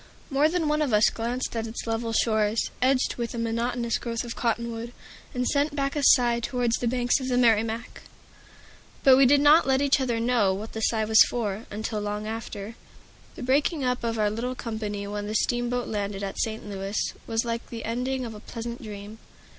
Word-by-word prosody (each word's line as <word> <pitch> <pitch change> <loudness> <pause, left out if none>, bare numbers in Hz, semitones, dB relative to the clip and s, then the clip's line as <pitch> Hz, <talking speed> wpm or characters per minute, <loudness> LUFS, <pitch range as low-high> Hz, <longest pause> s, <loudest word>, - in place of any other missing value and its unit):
More 285 +3 +3
than 335 -2 0
one 300 +1 +1
of 280 -6 0
us 210 +1 +5
glanced 240 +2 -3
at 225 0 -2
its 225 - -6
level 230 0 -2
shores, 220 -1 +1
edged 255 0 +2
with 235 -1 -3
a - - -4
monotonous 230 +1 -1
growth 230 -1 -3
of 235 -1 -6
cottonwood, 235 0 -2 0.4
and 250 0 -2
sent 290 +1 +1
back 275 0 -1
a 295 - 0
sigh 240 -3 +5
towards 240 0 0
the 245 - -2
banks 245 +1 +1
of 260 - -4
the 250 -1 +1
Merrimack. 225 -1 +1 1.0
But 265 -1 +8
we 265 0 +6
did 285 +2 +5
not 295 +2 +6
let 265 0 +3
each 280 0 +3
other 240 -3 0
know 230 -5 +2
what 215 +3 -7
the 220 - -4
sigh 220 -1 +1
was 220 0 +6
for, 215 -2 -3
until 215 +1 -3
long 210 0 -3
after. 220 -1 -6 0.6
The - - -7
breaking 285 +4 +1
up 250 -1 -1
of 230 -1 -1
our 210 -1 +2
little 245 +4 -3
company 215 -4 -4
when 205 0 -4
the 215 - -3
steamboat 240 +1 0
landed 200 -2 -3
at 195 - -4
Saint 220 -1 -2
Louis 195 0 -4 0.3
was 225 0 0
like 230 0 -3
the 230 -1 -6
ending 250 +3 -2
of 225 - -6
a 210 - -9
pleasant 235 +2 -7
dream. 210 0 -9
230 Hz, 200 wpm, -26 LUFS, 220-250 Hz, 1.0 s, But